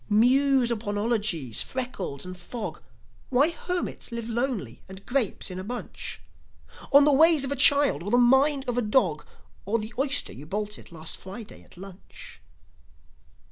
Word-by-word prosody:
Muse 255 +3 +3
upon 210 -3 -3
ologies, 205 - 0
freckles 205 - -4
and 185 0 -7
fog, 210 +5 -7 0.5
Why 275 +6 +3
hermits 360 -5 -4
live 235 -1 -5
lonely 235 - -3
and 190 +1 -12
grapes 245 -7 -2
in 180 - -6
a - - -5
bunch, 240 +4 -6 0.7
On 280 +1 +7
the 295 - +4
ways 315 0 +6
of 275 - -2
a - - 0
child 280 - +5
or 190 - -5
the 245 - +3
mind 265 +3 +3
of 245 0 0
a - - +1
dog, 205 - +1 0.4
Or 210 +4 0
the 215 +1 -6
oyster 270 0 -1
you 145 +4 -11
bolted 210 +2 -5
last 165 -1 -5
Friday 200 +3 -10
at - - -19
lunch. 190 0 -12
235 Hz, 160 wpm, -26 LUFS, 190-265 Hz, 0.7 s, On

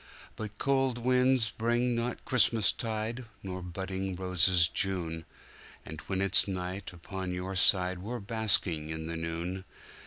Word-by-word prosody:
But 110 -1 -7
cold 135 -2 +1
winds 125 -1 +2
bring 120 +2 0
not 115 +1 -3
Christmastide, 115 0 +1 0.2
nor 95 -1 -5
budding 95 +1 -4
roses 90 -1 +4
June, 85 -5 -2 0.6
And 80 0 -8
when 95 -1 -1
it's 100 +1 +6
night 95 0 -4
upon 95 +1 -6
your 95 +2 -4
side 90 -1 +3
we're 115 +7 -5
basking 100 -7 +1
in 80 0 -4
the 85 +1 -4
noon. 85 +3 -4
95 Hz, 130 wpm, -30 LUFS, 90-115 Hz, 0.6 s, it's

